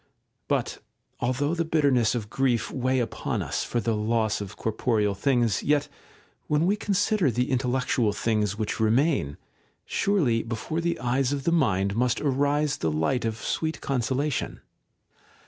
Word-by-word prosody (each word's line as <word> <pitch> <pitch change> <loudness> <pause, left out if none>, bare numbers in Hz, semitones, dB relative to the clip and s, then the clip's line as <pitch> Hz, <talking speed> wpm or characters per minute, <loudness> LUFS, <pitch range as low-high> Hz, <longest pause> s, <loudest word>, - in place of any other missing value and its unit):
§ - - -40
2. - - -41 0.4
But - - -1 0.4
although 135 +5 0
the 170 -1 0
bitterness 140 -8 +2
of 110 -4 -3
grief 125 -4 +1
weigh 130 0 0
upon 115 -2 -2
us - - -2
for 120 - -1
the 115 0 0
Ipss 110 0 0
of 100 0 -7
corporeal 110 -2 0
things, 120 -2 +1
yet, 145 0 +1 0.6
when 150 +2 +2
we 195 +3 +3
consider 205 -4 +1
the 125 +3 -1
intellectual 125 -3 +1
things 105 -1 0
which 110 0 -2
remain, 110 - +2 0.5
surely 150 - +1
before 115 +9 -3
the 170 0 -1
eyes 125 +2 +1
of 140 -1 -2
the 170 - +1
mind 100 - +2
must 125 +1 +1
arise 145 +1 +1
the 80 - -1
light 80 +11 0
of 110 -1 -2
sweet 160 +7 -2
consolation. 135 +2 -1
125 Hz, 155 wpm, -26 LUFS, 110-145 Hz, 0.6 s, we